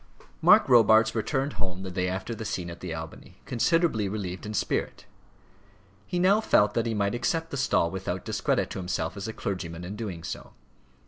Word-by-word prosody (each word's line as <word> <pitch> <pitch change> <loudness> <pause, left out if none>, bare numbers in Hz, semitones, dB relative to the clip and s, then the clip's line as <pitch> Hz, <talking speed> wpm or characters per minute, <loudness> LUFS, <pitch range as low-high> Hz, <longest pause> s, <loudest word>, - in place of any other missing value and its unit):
Mark - - +7
Robarts 110 -2 +6
returned 135 +5 -1
home 95 0 -4
the 95 - -5
day 90 0 -1
after 95 +5 -3
the 110 - -6
scene 90 -5 -3
at 85 - -10
the 90 - -6
Albany, 80 0 -8
considerably 120 - +1
relieved 95 -2 -5
in 105 - -4
spirit. - - -2 1.0
He 180 - -2
now 195 +4 +4
felt 105 - +3
that 115 0 0
he 115 - -1
might 100 0 0
accept 160 +8 -1
the - - -3
stall 85 -10 +2
without 95 0 -4
discredit 125 +5 0
to 100 - -4
himself 90 -2 -2
as 100 +1 -5
a - - -3
clergyman 90 -6 -4
in 95 +4 -6
doing 95 -7 -5
so. - - -7
105 Hz, 190 wpm, -27 LUFS, 90-120 Hz, 1.0 s, Mark